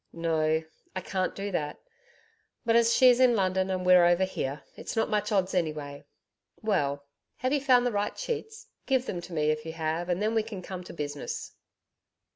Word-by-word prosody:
'No, 160 -1 +1 0.3
I 185 - -2
can't 185 0 -2
do 200 +1 -4
that; 150 -5 -2 0.9
but 230 0 +3
as 235 0 +5
she's 250 0 +6
in 250 -2 +5
London 190 -1 +1
and 185 -1 -2
we're 180 -1 +7
over 175 +2 +4
here, 145 -6 -3
it's - - -6
not 225 - 0
much 210 0 0
odds 190 -2 +1
anyway. 150 -5 -2 0.5
Well, 145 -10 0 0.3
have 255 +2 -1
you 290 - +2
found 250 -2 +4
the 245 - +1
right 205 -1 -2
sheets? 445 -1 -5 0.2
Give 260 -2 +2
them 175 -8 -4
to 180 - -11
me 155 -1 +2
if 155 0 -3
you 160 0 -6
have 160 +2 -2
and 175 0 +1
then 215 +2 0
we 225 - +3
can 210 -4 -7
come 185 -1 -6
to - - -9
business.' 145 -3 -5
185 Hz, 195 wpm, -28 LUFS, 160-225 Hz, 0.9 s, we're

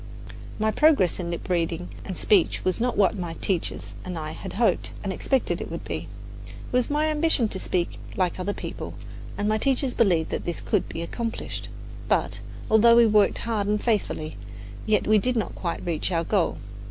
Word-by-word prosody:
My 220 0 +1
progress 285 - +4
in 170 -1 -3
lip 170 - -5
reading 170 -1 -1
and 190 - -6
speech 195 -6 +2
was 185 +4 +1
not 245 0 0
what 200 0 +4
my 175 -2 -3
teachers 180 -2 -2
and 180 -2 -5
I 155 -1 -4
had - - -7
hoped 230 +2 +1
and 195 -2 -2
expected 265 +6 0
it - - -5
would - - -5
be. - - -4 0.4
It - - -12 0.2
was 250 -1 +2
my 300 +1 +2
ambition 310 -5 +3
to 190 - -4
speak 175 -2 -1 0.2
like 185 -1 0
other 185 +2 -1
people, - - -6 0.4
and 205 - 0
my 215 0 +2
teachers 265 0 +1
believed 175 -8 +2
that - - -2
this 175 - -3
could 205 -5 0
be 165 - -4
accomplished; 230 +6 -4 0.4
but, - - +1 0.3
although 230 +2 +6
we 235 0 +7
worked 210 -2 +4
hard 215 -3 0
and 210 0 +1
faithfully, 205 -9 -1 0.5
yet 215 -1 +3
we 215 0 +5
did 250 +4 0
not 225 - -1
quite 170 -2 -4
reach 170 +1 -1
our 165 -1 +1
goal. 185 0 +1
205 Hz, 190 wpm, -25 LUFS, 175-235 Hz, 0.5 s, we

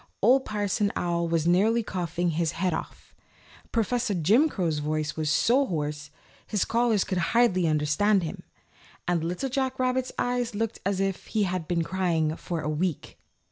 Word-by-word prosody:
Old 260 +5 +4
Parson 205 -1 0
Owl 170 -1 0
was 165 -1 0
nearly 210 +7 +3
coughing 175 -3 -2
his 165 +1 0
head 180 0 0
off, - - -7 0.6
Professor 230 -1 0
Jim 215 - +4
Crow's 170 - -1
voice 155 0 -2
was 155 -1 -1
so 245 - +3
hoarse 150 -2 -3 0.4
his 210 -3 -1
scholars 230 -3 +2
could 185 -2 -2
hardly 185 -1 +3
understand 155 +7 +2
him, 160 - -5 0.7
and 175 -2 +1
Little 180 +11 -2
Jack 260 0 -1
Rabbit's 255 0 0
eyes 245 -2 -1
looked 225 +1 -2
as 200 -1 0
if 195 -1 -2
he 215 -2 0
had 185 -4 -2
been 170 -2 0
crying 165 -4 0
for 170 -1 -4
a 150 - -4
week. 155 +1 -3
185 Hz, 165 wpm, -27 LUFS, 165-225 Hz, 0.7 s, Old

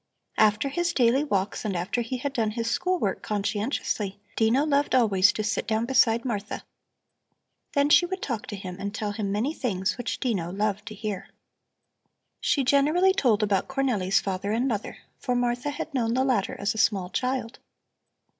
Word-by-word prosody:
After 215 +5 +3
his 345 +5 -1
daily 250 +3 +3
walks 200 -8 -1
and 205 -4 -2
after 190 +7 -1
he 240 +2 -3
had 275 +2 -3
done 225 -5 +1
his 230 +1 -3
school 365 0 +1
work 200 - -1
conscientiously, 205 -1 -2 0.2
Dino 235 +6 +3
loved 285 -2 +2
always 205 -5 +5
to 215 - -2
sit 215 +2 -1
down 220 +1 +1
beside 235 -2 +3
Martha. 210 -4 -4 1.1
Then 285 -1 +3
she 350 - +6
would 375 +1 -5
talk 235 -6 -3
to 205 - -5
him 185 -2 -7
and 200 +1 -4
tell 210 -2 -2
him 205 -1 -3
many 225 +9 0
things 210 - -2
which 245 - -3
Dino 190 -9 -1
loved 205 +1 -2
to 215 - -6
hear. 205 -2 -5 1.1
She 290 -2 +1
generally 300 +8 +4
told 230 - +2
about 200 -2 +1
Cornelli's 245 -9 +1
father 195 +1 -3
and 235 +4 +1
mother, 215 -5 -3 0.2
for 250 - -1
Martha 245 +3 0
had 290 +2 -5
known 235 -3 0
the 260 - +2
latter 245 -7 0
as 200 +1 0
a 220 - -5
small 190 -5 +1
child. 255 -2 -2
225 Hz, 180 wpm, -26 LUFS, 205-265 Hz, 1.1 s, she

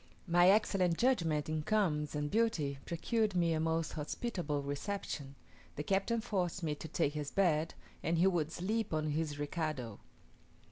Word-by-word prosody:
My 175 0 +5
excellent 190 -4 +3
judgment 170 - +2
in 155 0 -1
combs 155 -6 +1
and 145 0 -2
beauty 170 -12 +1
procured 215 +4 0
me 170 -2 +3
a 160 - 0
most 160 0 0
hospitable 155 -2 -2
reception; 140 -2 -4 0.4
the 150 - -3
captain 200 +6 +1
forced 190 -5 -1
me 155 -2 0
to 150 - -7
take 155 -2 0
his 150 -2 -3
bed, 165 -5 +1 0.3
and 165 +1 0
he 175 - +4
would 170 -5 +2
sleep 205 +1 -1
on 155 0 0
his 150 -1 -1
recado. 145 - -3
165 Hz, 155 wpm, -34 LUFS, 150-195 Hz, 0.4 s, My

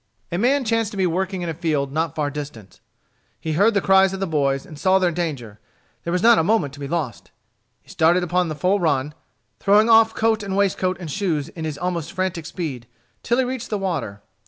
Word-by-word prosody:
A 175 - -1
man 260 +4 +2
chanced 225 -1 +1
to 205 - -9
be 190 - +2
working 185 +1 -1
in 170 - -3
a - - -2
field 150 -4 -1
not 160 +1 -2
far 145 -2 -1
distant. 140 -10 -8 0.6
He 160 +6 -4
heard 205 +7 +3
the 200 - +3
cries 190 0 +4
of 195 - -5
the 195 - -1
boys 140 -5 0
and 155 - -12
saw 190 +2 +4
their 180 -2 +2
danger. 140 -11 -4 0.4
There 170 - -3
was 180 +1 0
not 235 0 +6
a - - +2
moment 180 -7 +1
to 145 - -12
be 140 - -5
lost. 145 -8 -4 0.5
He - - -24
started 170 +3 +3
upon 180 0 0
the 155 - -4
full 185 +6 +1
run, 150 -4 0 0.5
throwing 210 +3 +4
off 225 0 +5
coat 225 -1 +1
and 195 -1 -3
waistcoat 185 -2 +1
and 165 -4 -6
shoes, 165 -5 -1
in 165 -1 -7
his 155 -2 -4
almost 170 -2 -3
frantic 185 -4 -2
speed, 140 -9 -5 0.3
till 240 - 0
he 260 - +3
reached 250 -1 -4
the 210 - -1
water. 155 - -4
175 Hz, 225 wpm, -22 LUFS, 150-195 Hz, 0.6 s, not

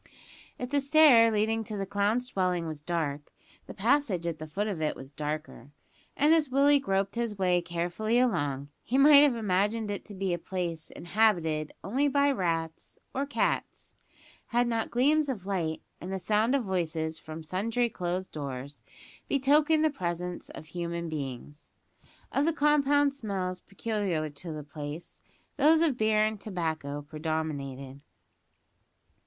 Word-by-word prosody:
If 250 +1 -5
the 290 - +3
stair 280 -5 +6
leading 220 +1 +1
to 210 +1 -5
the 195 - -2
clown's 205 +5 0
dwelling 180 -4 0
was 155 -2 -6
dark, 150 -3 -3 0.4
the - - -8
passage 225 - +1
at 165 -2 -3
the 155 - -6
foot 200 +7 -2
of 195 -7 -3
it 155 - 0
was 135 +1 -10
darker; 150 -2 -5 0.4
and 300 +3 +5
as 315 -4 +3
Willie 280 +2 +5
groped 195 -6 0
his 235 -3 -2
way 180 -2 +2
carefully 175 +7 -1
along, 145 - 0
he 255 - -1
might 285 +1 +8
have 290 -4 +4
imagined 210 +1 0
it 200 - -4
to 205 - -10
be 190 -1 -1
a 175 - -2
place 170 -3 -4
inhabited 170 -5 +1
only 255 - +1
by 285 0 +3
rats 165 - -3 0.2
or 275 +2 -1
cats, 285 - -2 0.5
had 240 +1 +2
not 230 -1 -1
gleams 290 +4 +2
of 210 -8 -4
light, 170 -5 -2 0.2
and 180 - -6
the 190 - -1
sound 215 +6 +2
of 270 - +1
voices 160 -4 -2
from 155 +1 -8
sundry 225 +8 0
closed 185 -3 -3
doors, 140 -2 -6 0.5
betokened 300 +3 +3
the 310 - +3
presence 175 - -4
of - - -10
human 170 0 -4
beings. 145 -1 -6 0.6
Of 275 - +1
the 330 - +2
compound 290 -1 +3
smells 190 -8 -3
peculiar 195 -7 -2
to 160 +4 -8
the 155 -1 -6
place, 150 +2 -8 0.4
those 315 +2 +5
of 300 -6 +2
beer 215 -2 +3
and 215 -2 -3
tobacco 160 -7 -3
predominated. 145 -3 -4
190 Hz, 155 wpm, -29 LUFS, 160-240 Hz, 0.6 s, might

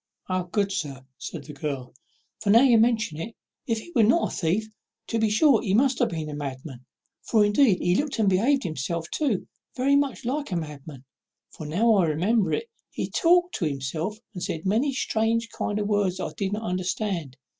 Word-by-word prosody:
"O 185 -1 0
good 200 +2 0
sir!" 140 -8 -4
said - - -6
the 150 - -10
girl, 140 -3 -5 0.5
"now 220 +4 +6
you 240 -4 +6
mention 220 -9 +1
it, 225 +8 -6 0.3
if 230 -2 +1
he 285 +10 -9
was 225 -5 +4
not 335 +9 +2
a - - -4
thief, 190 +6 0 0.4
to 230 - -1
be 220 -1 +2
sure 235 +3 +4
he 195 -2 0
must 260 +2 +3
have - - +2
been 160 -2 -4
a 150 - -6
madman: 135 -2 -6 0.4
for 215 -3 +3
indeed 205 -1 +4
he 175 - +1
looked, 280 +7 0
and 220 -2 +2
behaved 240 +9 +3
himself 160 +2 -3
too, 265 -11 -1 0.3
very 270 +2 +3
much 280 -2 0
like 280 0 -2
a - - 0
madman; 150 -4 -7 0.5
for, 155 - -8
now 220 +9 +3
I 185 - +4
remember 190 +8 +1
it, 455 +1 -1 0.2
he - - -4
talked 355 +1 +3
to 175 - -1
himself 155 +8 -3 0.2
and 180 - -7
said 160 -1 -4
many 230 +9 +2
strange 230 -2 0
kind 205 - -2
of 210 - -1
words 205 -3 +1
that - - -3
I - - -6
did 195 0 -2
not 215 +2 -3
understand. 180 - -2
205 Hz, 200 wpm, -25 LUFS, 160-230 Hz, 0.5 s, now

